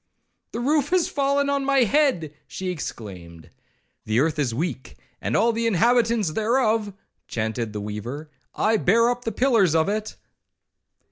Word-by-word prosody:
—'The - - -3
roof 290 +3 +1
has 365 -2 +2
fallen 280 0 +1
on 280 -1 0
my 275 -1 +3
head!' 240 - +1
she 185 -1 -4
exclaimed. 90 - -8 0.5
'The 110 +2 +1
earth 155 +2 +1
is 135 -5 +1
weak, 130 +1 -4 0.3
and - - 0
all 230 +3 +3
the 230 +1 0
inhabitants 230 -2 +2
thereof,' 220 +1 +1 0.4
chaunted 110 0 -3
the 105 -1 -5
weaver; 110 +9 -6 0.3
'I 220 +1 +2
bear 230 +5 +3
up 245 0 -5
the 225 - -1
pillars 225 - +3
of 160 +1 +3
it.' 215 +1 -3
215 Hz, 150 wpm, -24 LUFS, -, 0.5 s, my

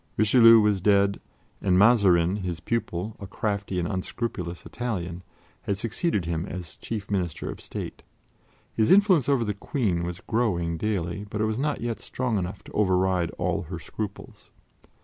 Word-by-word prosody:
Richelieu 115 +1 +7
was 105 -3 +2
dead, 100 0 +3 0.4
and 90 -2 +3
Mazarin, 95 -4 +5
his 90 -5 -4
pupil, 110 -2 -3
a 100 - -7
crafty 100 -2 -2
and 85 -1 0
unscrupulous 95 -3 -4
Italian, 90 -8 -4 0.4
had 100 - -2
succeeded 115 - -1
him 85 -1 -2
as 90 -3 -7
chief 105 -3 -6
Minister 90 -5 -2
of - - -10
State. - - -6 0.7
His 110 -1 +2
influence 185 - +5
over 135 -4 +3
the 105 - -1
Queen 100 -4 -1
was 85 0 -4
growing 90 -8 0
daily, 100 -1 -2
but 105 - -4
it 110 - +2
was 110 +2 -1
not 150 +1 -1
yet 115 -1 -3
strong 125 -5 -2
enough 95 +2 -5
to - - -13
override 95 -3 +2
all - - 0
her 90 - -4
scruples. 100 +4 -7
100 Hz, 160 wpm, -26 LUFS, 90-115 Hz, 0.7 s, Richelieu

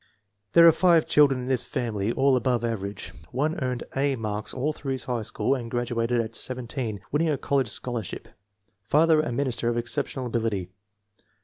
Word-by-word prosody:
There 170 0 +8
are - - +10
five 170 -2 +4
children 140 -3 +4
in - - -5
this 130 -2 +1
family, 115 -5 -2
all 135 +2 +3
above 120 -1 +1
average. 100 -4 -4 0.2
One 150 +6 -1
earned 125 -2 -2
"A" 135 0 +1
marks 105 -2 -3
all 145 +4 -1
through 135 -3 -3
high 125 -2 -3
school 125 +4 0
and 120 -4 -4
graduated 120 0 0
at 115 0 -2
17, 125 -4 -4
winning 155 +3 +1
a 145 - +1
college 135 -3 0
scholar 120 +1 -3
ship. 95 - -8 0.5
Father 155 +9 +4
a 155 - -3
minister 120 -2 -1
of 120 - -1
exceptional 130 +2 -2
ability. 110 -6 -2
125 Hz, 175 wpm, -26 LUFS, 115-140 Hz, 0.5 s, are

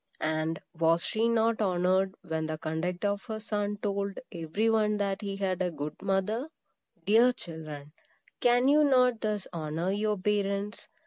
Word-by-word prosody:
And 155 +1 -1 0.2
was 165 +1 +3
she 225 +1 +1
not 230 -1 +2
honored, 185 0 +2
when 160 -2 -2
the 155 0 -3
conduct 165 +5 -3
of 200 0 0
her 220 -2 -4
son 205 -1 -2
told 200 -1 -1
every 170 +4 -1
one 215 -2 +2
that 200 0 -1
he 200 -1 -3
had 190 -2 -1
a 180 - +1
good 150 -2 -5
mother? 200 +8 0 0.6
Dear 230 +4 +6
children, 155 - -8 0.5
can 245 +1 +4
you 300 +2 +6
not 250 -4 +4
thus 210 -3 -1
honor 165 +2 -2
your 210 +1 0
parents? 200 +1 -1
200 Hz, 155 wpm, -29 LUFS, 170-215 Hz, 0.6 s, Dear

